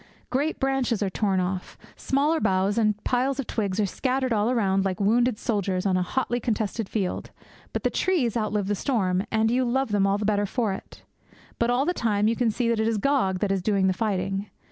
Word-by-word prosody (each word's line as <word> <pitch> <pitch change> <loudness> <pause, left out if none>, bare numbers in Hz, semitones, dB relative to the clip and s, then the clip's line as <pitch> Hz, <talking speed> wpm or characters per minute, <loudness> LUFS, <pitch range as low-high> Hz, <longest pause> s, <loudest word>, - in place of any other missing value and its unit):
Great 290 +5 0
branches 265 -5 0
are 195 - -1
torn 195 -1 +1
off; 185 0 -3 0.2
smaller 295 +4 +1
boughs 195 0 +1
and 210 -2 +2
piles 260 +2 0
of 275 - -1
twigs 205 -4 -2
are 210 - +3
scattered 255 +5 -1
all 210 +1 +1
around 195 -6 +2
like 190 -2 -2
wounded 235 +3 +2
soldiers 195 -5 -1
on 190 -2 +2
a 185 - +2
hotly 240 +5 -1
contested 220 -2 -2
field; 195 -5 -2 0.4
but - - -3
the - - +2
trees 290 - +1
outlive 210 -3 0
the 205 - 0
storm, 190 -5 0
and 220 0 +2
you 255 +2 +2
love 260 +1 0
them 200 -1 +3
all 195 +1 +2
the 205 - -3
better 205 -1 +1
for 220 -1 -1
it. - - -10 0.6
But, 235 - +2
all 250 +3 +2
the 355 - +1
time, 210 - +1
you 230 - +2
can 240 -1 +1
see 235 +2 -1
that 230 -1 +1
it 220 - +1
is 225 -1 +1
Gog 210 -6 +1
that 205 - +1
is 195 -1 0
doing 195 0 +1
the 190 - +3
fighting. 195 -1 -2
215 Hz, 220 wpm, -25 LUFS, 195-245 Hz, 0.6 s, are